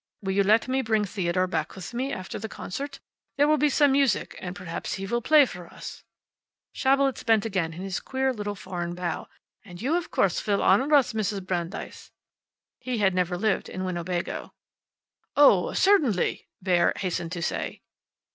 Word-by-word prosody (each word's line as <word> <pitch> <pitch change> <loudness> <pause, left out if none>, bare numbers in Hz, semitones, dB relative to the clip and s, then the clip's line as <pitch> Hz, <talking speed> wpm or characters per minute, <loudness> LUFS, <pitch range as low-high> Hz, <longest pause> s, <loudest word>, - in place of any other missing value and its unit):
Will 190 - -1
you 200 - +3
let 215 +5 +3
me 260 +1 +1
bring 220 -3 +1
Theodore 185 -2 0
back 185 - -3
with 190 +4 -8
me 260 +3 -2
after 185 -5 -5
the 220 - -5
concert? 280 +11 -6 0.4
There 290 +1 +4
will 305 0 +3
be 300 +1 +4
some 290 0 +4
music, 270 -5 +1
and 180 0 -6
perhaps 180 -4 -5
he 195 - -5
will 235 +4 -1
play 300 +3 +6
for 180 -7 -9
us." - - -10 0.7
Schabelitz 275 0 +2
bent 225 -2 +3
again 185 -7 -1
in 175 +4 -7
his 195 -1 -3
queer 265 0 -1
little 205 -2 -4
foreign 175 -3 -5
bow. 175 -1 -3 0.4
"And 180 -5 -11
you, 275 +8 0
of 350 -1 -2
course, 195 - +1
will 200 -1 +2
honor 260 +10 +4
us, 260 -4 +3
Mrs. 205 -3 -2
Brandeis." 175 0 -4 0.7
He 255 -1 -3
had 195 -3 +3
never 180 -1 0
lived 215 +1 0
in 185 0 -4
Winnebago. 175 -1 -3 0.8
"Oh, 215 -11 +6
certainly," 300 - +2 0.2
Bauer 180 -2 +3
hastened 175 -3 -3
to 175 -2 -4
say. - - -3
200 Hz, 175 wpm, -26 LUFS, 180-260 Hz, 0.8 s, play